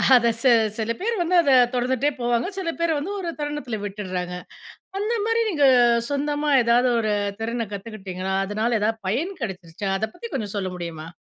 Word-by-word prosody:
அத 235 -1 +4
சே 260 - +5 0.3
சில 225 0 -1
பேரு 460 +5 -1
வந்து 345 +2 +1
அத 285 - +2 0.2
தொடர்ந்துட்டே 255 +3 +1
போவாங்க. 240 +2 +1
சில 355 -3 -2
பேர் 335 -1 +1
வந்து 330 +8 -4
ஒரு 350 -3 -3
தருணத்தில 295 -6 -3
விட்டுறாங்க. 185 -3 -4 0.6
அந்தமாரி 450 +2 0
நீங்க 295 -7 +3 0.4
சொந்தமா 290 +1 -1
எதாவது 240 +2 +4
ஒரு 215 -2 0 0.3
திறன 230 0 -2
கத்துக்கிட்டீங்களா? 190 -2 -5
அதனால 220 +4 0
எதாவது 220 +2 0
பயன் 310 - -1
கிடைச்சிருச்சா? 190 -3 -5
அத 220 +2 -2
பத்தி 465 - -8
கொஞ்சம் 210 -5 -3
சொல்ல 190 -2 -2
முடியுமா? 165 -3 -6
235 Hz, 160 wpm, -23 LUFS, 205-295 Hz, 0.6 s, சே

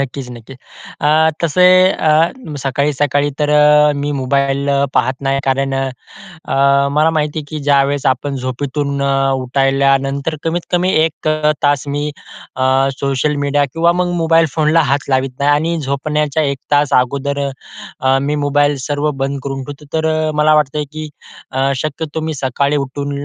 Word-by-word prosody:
नक्कीच-नक्कीच. 125 -2 -6 0.4
अ, 155 +2 +3
तसे 175 +3 +3 0.3
अ, 155 +2 +2 0.3
सकाळी-सकाळी 145 +1 0
तर 150 -1 0 0.5
मी 145 +1 -2
मोबाईल 140 +1 0 0.3
पाहत 130 +2 +1
नाही. 135 0 0
कारण 135 0 0 0.5
अ, 140 -6 +1
मला 155 +3 +3
माहितीयं 150 -1 -1
की 155 +1 -6
ज्यावेळेस 140 0 +1
आपण 135 +2 0
झोपेतून 140 +2 -3
उठल्यानंतर 135 +2 +1
कमीत-कमी 175 +2 -1
1 155 -1 -3 0.4
तास 145 -1 +1
मी 145 +1 -2 0.5
अ, 130 - -1 0.4
सोशल 140 +2 0
मीडिया 145 0 +1
किंवा 170 +1 +3
मग 180 0 -1
मोबाईल 165 0 +4
फोनला 160 +1 +3
हात 140 0 -1
लावत 130 0 +1
नाही. 145 +1 +2
आणि 165 +3 +1
झोपण्याच्या 150 +2 -1
1 140 -1 -1
तास 145 -1 +2
अगोदर 140 +3 0 0.8
मी 145 +2 -1
मोबाईल 145 0 +1
सर्व 145 +3 -1
बंद 135 0 -3
करून 135 -1 -4
ठेवतो. 145 +2 -10
तर 160 0 0 0.2
अ, - - -1
मला 150 +1 +3
वाटतं 150 0 0
की 155 0 -6 0.7
शक्यतो 155 +3 -4
मी 160 0 -3
सकाळी 140 +2 -1
उठून 140 +1 -4
145 Hz, 135 wpm, -16 LUFS, 135-150 Hz, 0.8 s, मोबाईल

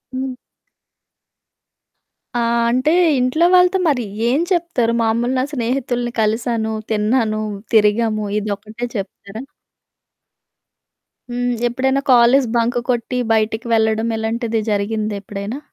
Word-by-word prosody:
హ్మ్. 260 -1 -3 2.0
ఆ! - - +1 0.3
అంటే 255 +5 +2 0.3
ఇంట్లో 255 +7 +2
వాళ్ళతో 360 +1 +4
మరి 270 -5 +1 0.2
ఏం 270 +7 +2
చెప్తారు? 335 -10 +1
మామూలుగా 235 +3 0
నా 255 - +1
స్నేహితుల్ని 245 -1 -2
కలిసాను, 220 +1 0 0.2
తిన్నాను, 215 0 +1 0.3
తిరిగాము 215 0 +2
ఇదొక్కటే 215 +3 -5
చెప్తారా? 200 +1 -6 1.9
హ్మ్. 245 0 -1 0.2
ఎప్పుడైనా 265 +3 0
కాలేజు 245 +2 +5
బంక్ 235 +1 +1
కొట్టి, 245 +1 -1 0.2
బయటికి 220 +2 0
వెళ్ళడం, 220 0 +2
ఇలాంటిది 225 0 -2
జరిగిందేప్పుడైనా? 205 +2 -3
235 Hz, 95 wpm, -19 LUFS, 220-250 Hz, 2.0 s, కాలేజు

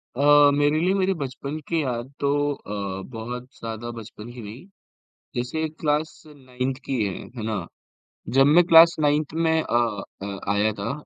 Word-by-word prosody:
अ, 145 +1 +6
मेरे 145 +2 +2
लिए 180 +4 +2
मेरी 195 -1 +1
बचपन 140 +3 -5
की 165 -2 0
याद 125 -1 -3
तो 140 - +1 0.2
अ, 100 -5 -5
बहुत 120 +3 -6
ज़्यादा 115 +1 -5
बचपन 115 0 -10
की 120 - -9
नहीं। 110 - -10 0.7
जैसे 155 +6 -2
क्लास 155 0 -1
9th 130 -2 -5
की 130 -5 -1
है, 100 -2 -2 0.2
हैं 115 - -5
ना? 110 -1 -3 0.7
जब 135 - +7
मैं 160 +5 +6
क्लास 165 +1 +8
9th 150 0 +1
में 160 0 +2
अ 120 - -3 0.5
अ, 100 0 -5
आया 105 +2 +2
था, 105 +4 -2
135 Hz, 165 wpm, -24 LUFS, 115-155 Hz, 0.7 s, क्लास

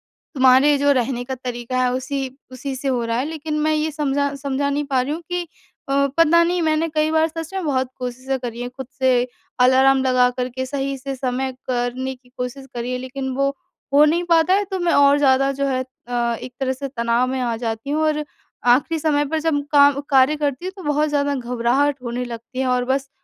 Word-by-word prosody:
तुम्हारे 265 +2 +4
जो 285 +1 +3
रहने 250 -2 0
का 260 +1 -5
तरीक़ा 250 0 -3
है, 250 - +2
उसी 265 +1 -3 0.2
उसी 265 +1 -5
से 275 +2 -4
हो 250 -3 0
रहा 230 0 -1
है।" 255 - 0
लेकिन 310 -1 -3
मैं 310 +1 +2
ये 310 +1 0
समझा 285 -1 -1
समझा 280 0 -2
नहीं 285 +1 -1
पा 270 -3 +1
रही 275 +4 -2
हूँ 330 - -5
कि 355 -1 -2 0.4
अ, - - +1 0.2
पता 330 +1 +5
नहीं 350 +1 0
मैंने 315 0 +1
कई 310 0 +2
बार 320 0 +3
सच 325 +2 -7
में 380 -1 -2
बहुत 260 -3 0
कोशिशें 255 +1 -3
करी 240 -1 -5
हैं 245 - -4
ख़ुद 260 0 -9
से, 255 -2 +3 0.3
अलार्म 265 +1 +5
लगा 255 -1 +4
कर 250 -1 -1
के 260 +1 -4
सही 275 0 -3
से 270 +1 -5
समय 260 0 -2 0.2
करने 255 +1 -2
की 250 0 -26
कोशिश 250 +2 -5
करी 240 +1 -3
है। 250 - -1
लेकिन 265 +1 -5
वो 275 +1 +2 0.4
हो 290 +1 +7
नहीं 335 +3 +2
पाता 335 +2 +4
है, 405 +2 +3
तो 380 -1 -4
मैं 350 -1 +1
और 285 0 +5
ज़्यादा 275 -1 +3
जो 280 +1 -2
है 260 -1 0 0.2
अ, 240 -1 0
एक 250 0 -8
तरह 265 -1 0
से 275 +1 -5
तनाव 235 -1 0
में 260 +1 -2
आ 240 -2 -1
जाती 225 +2 -4
हूँ। 300 +2 0
और 305 -1 +1 0.5
आख़िरी 320 +5 0
समय 295 -1 +1
पर 315 +3 -1
जब 305 -2 0
काम 285 -1 +5
कार्य 270 +1 +5
करती 290 +1 -2
हूँ 375 - -4
तो 375 - -9
बहुत 300 0 +1
ज़्यादा 285 -1 0
घबराहट 250 +3 0
होने 245 +1 -3
लगती 240 +2 -8
है, 265 - 0
और 250 -1 +1
बस 270 +1 -1
270 Hz, 225 wpm, -21 LUFS, 255-295 Hz, 0.5 s, हो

